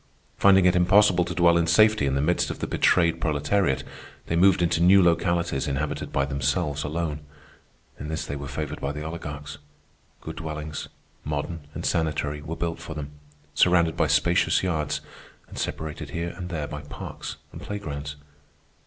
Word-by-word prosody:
Finding 95 -2 +5
it 90 - +4
impossible 90 0 +5
to 90 0 -5
dwell 85 -1 +5
in 85 - +1
safety 105 -2 +4
in 65 - 0
the 70 - +1
midst 90 +3 +1
of - - -4
the - - -3
betrayed 85 -2 +2
proletariat, 75 +1 +1 0.4
they 85 - -1
moved 90 +1 +4
into 85 -1 +1
new 95 +3 +7
localities 85 -4 +1
inhabited 70 +1 -3
by 70 - +1
themselves 70 +2 -1
alone. 75 0 -2 0.8
In 75 - -6
this 80 +1 -3
they 70 - -4
were 70 0 -6
favored 75 +2 -5
by 70 +1 -2
the 75 +1 -6
oligarchs. 75 -2 -6 0.6
Good 80 0 -8
dwellings, 75 -1 -5 0.4
modern 75 +1 -4
and - - -4
sanitary, 75 -2 -1
were 80 +3 -5
built 85 -1 -3
for 80 -1 -8
them, 75 -2 -6 0.4
surrounded 85 -2 +3
by - - +2
spacious - - +2
yards, 80 -5 -1 0.5
and - - -8
separated 75 -1 -4
here 85 +3 -3
and 90 -1 -6
there 80 -4 -3
by - - -6
parks - - -7 0.2
and - - -10
playgrounds. 75 -8 -5
80 Hz, 170 wpm, -25 LUFS, 75-85 Hz, 0.8 s, new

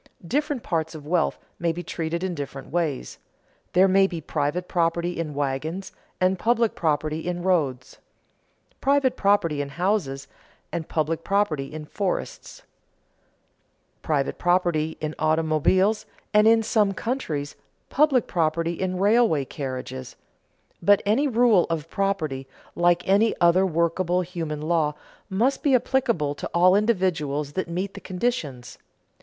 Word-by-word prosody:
Different 290 - -1
parts 160 -1 -2
of 150 -2 -9
wealth 165 0 +1 0.2
may 170 -1 +1
be 175 +2 -6
treated 170 +1 -3
in 190 -1 -1
different 140 -3 -7
ways: 160 -5 -2 0.5
there 185 +2 +6
may 195 +1 +4
be 175 -3 -5
private 155 +3 -2
property 170 0 0
in 155 -3 -4
wagons, 145 +7 -3 0.3
and 185 0 +2
public 230 -1 +2
property 155 -1 -1
in 175 -1 -3
roads; 140 -9 0 0.8
private 275 -2 +2
property 190 -7 +2
in 140 - -4
houses, 160 -4 -1 0.4
and 165 -2 -4
public 160 +1 -1
property 170 -9 0
in 155 0 -7
forests; 190 +4 -4 1.4
private 140 -3 -1
property 175 -3 +1
in 155 -1 -3
automobiles, 160 +6 +2 0.3
and, 210 +1 +5
in 225 0 +5
some 210 -2 +2
countries, 160 - -3 0.4
public 275 -4 +3
property 165 0 0
in 185 +1 -2
railway 200 - +3
carriages. 130 -2 -6 0.7
But 205 +3 +4
any 235 +9 +2
rule 235 -7 +4
of 165 -1 -3
property, 160 -10 -1 0.3
like 175 0 +2
any 205 +4 +3
other 175 +2 +4
workable 170 +2 +1
human 165 -4 -5
law, 155 -2 +1 0.3
must 230 +8 +1
be 280 -3 +3
applicable 235 - +1
to - - -6
all 180 +2 +5
individuals 165 -9 0
that 185 -2 -3
meet 185 +3 -3
the 200 - -9
conditions. 170 - -3
175 Hz, 135 wpm, -24 LUFS, 155-195 Hz, 1.4 s, there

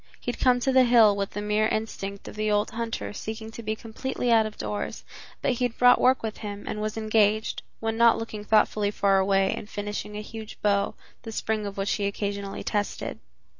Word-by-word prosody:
He 245 - -2
had - - -11
come 250 -1 +4
to 265 - +2
the 260 -1 +6
hill 230 -4 +6
with 200 -1 -2
the 205 - -5
mere 210 +1 +2
instinct 200 -3 -4
of - - -8
the 215 0 -1
old 210 0 +1
hunter 230 -2 -4
seeking 220 +1 -6
to 235 - -8
be 215 -1 -2
completely 240 +2 -3
out 220 -1 +5
of 215 - -10
doors, 205 - -4 0.4
but - - +3
he 250 0 0
had 235 -2 -3
brought 245 0 +6
work 255 -1 +4
with 220 -1 -3
him 205 -1 -6
and 210 - -3
was 215 +1 -3
engaged, 215 0 +2 0.2
when 225 0 -2
not 235 0 +6
looking 220 -2 -5
thoughtfully 210 -1 +3
far 200 -1 +2
away, 195 0 +2
in - - -7
finishing 210 0 -5
a - - -4
huge 220 0 -9
bow, 200 -1 +2 0.3
the 225 - -7
spring 215 -1 -2
of 200 - -7
which 195 +1 -1
he 200 -1 0
occasionally 200 0 -4
tested. 205 -1 -2
215 Hz, 215 wpm, -26 LUFS, 205-225 Hz, 0.4 s, the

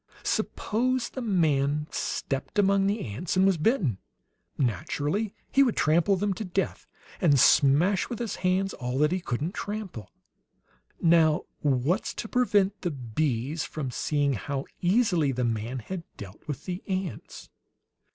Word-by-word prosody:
Suppose 250 +3 0
the 260 - -6
man 150 - +1
stepped 135 +7 -3
among 195 -1 +4
the 205 +2 0
ants 140 - -3
and 190 - +5
was 190 -4 +3
bitten. 155 - +1 0.6
Naturally 150 - -1 0.2
he 275 - +4
would 250 -5 +3
trample 170 +6 +3
them 200 +1 0
to 220 - -5
death, 190 0 -2 0.3
and 145 -6 +4
smash 155 +9 +4
with 240 - -4
his 235 -2 -4
hands 185 +1 +1
all 125 +1 -3
that 150 +2 +3
he 185 - 0
couldn't 150 +6 -3
trample. 205 - -6 0.9
Now, 165 -2 +4 0.2
what's 145 - 0
to 225 - -5
prevent 205 -5 +2
the 175 - -1
bees 135 +2 -2
from 140 -5 -4
seeing 145 +2 0
how 135 +4 -3 0.2
easily 180 - +3
the 125 -1 -1
man 115 +2 -2
had 170 - -5 0.2
dealt 100 +5 -11
with 145 -4 -5
the 180 0 -4
ants? 185 - -5
170 Hz, 145 wpm, -27 LUFS, 140-195 Hz, 0.9 s, and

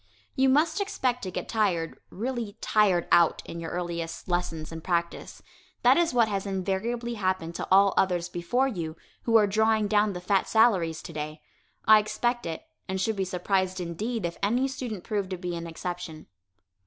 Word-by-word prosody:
You 265 -1 +4
must 310 +8 +3
expect 260 - -1
to 190 - -4
get 185 - -5
tired, 185 -7 0
really 230 -1 -4
"tired 195 -5 +2
out," 170 -1 +4
in 170 - -7
your 165 -1 -5
earliest 170 -1 -4
lessons 175 -3 -2
and 165 -1 -7
practice. 170 -2 -2 0.4
That 250 +2 +7
is 340 +1 +2
what 235 -3 +3
has 200 -1 -2
invariably 205 +5 -2
happened 185 -5 -1
to - - -4
all 195 +1 +6
others 180 -2 +1
before 180 +10 0
you, 165 -9 -4 0.3
who 230 - +2
are 215 -2 +7
drawing 215 +1 +2
down 210 0 +2
the 180 - -5
fat 190 +2 +1
salaries 190 -8 +3
today. 155 -1 -6 0.5
I 215 0 +8
expect 240 +1 -1
it, 165 -1 -5 0.2
and 190 0 -2
should 220 +3 0
be 195 -1 -1
surprised 185 +1 0
indeed 200 +6 -3
if 170 - -4
any 240 +7 +2
student 245 -8 -5
proved 205 -4 -2
to 185 - -3
be 175 -1 -4
an 170 0 -5
exception. 165 -1 -6
195 Hz, 180 wpm, -27 LUFS, 175-225 Hz, 0.5 s, I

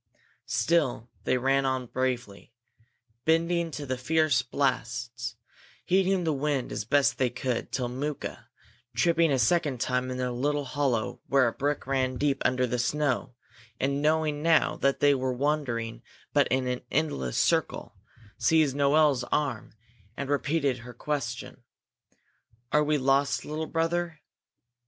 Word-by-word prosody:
Still 135 -8 +1
they 130 - +2
ran 135 +2 +2
on 130 -1 -1
bravely, 125 -4 -3 0.7
bending 165 +2 +2
to 145 -1 -6
the 130 -1 -3
fierce 155 -1 +2
blasts, 120 -2 -2 0.5
heading 190 0 +2
the 160 -2 +1
wind 140 -2 -1
as - - -3
best 140 +4 +2
they 130 -2 +2
could, 125 0 -3
till 125 -2 -1
Mooka, 140 +4 -5 0.5
tripping 170 -2 +3
a 135 - +3
second 135 +2 +2
time 125 +1 0
in 130 0 -4
a 125 -1 -1
little 145 +4 -1
hollow 130 -5 -1
where 135 -2 +4
a - - 0
brook 145 +1 -2
ran 130 -1 0
deep 140 0 0
under 125 0 +2
the 125 0 -2
snow, 135 -1 0 0.4
and 140 +1 0
knowing 155 -1 +1
now 165 0 +3
that 140 0 0
they 145 0 +6
were 130 -1 -1
but - - -7
wandering 130 -6 -1 0.5
in 130 0 +1
an 125 0 -2
endless 130 - -1
circle, - - 0 0.4
seized 155 -4 +3
Noel's 140 -2 +3
arm 130 -8 -2 0.4
and 140 0 -3
repeated 140 -3 0
her 120 +1 -11
question: 120 -4 -4 1.1
"Are 150 - +4
we 150 0 +2
lost, 135 +1 +1
little 155 +1 -4
brother?" 165 0 -1
135 Hz, 140 wpm, -28 LUFS, 125-150 Hz, 1.1 s, they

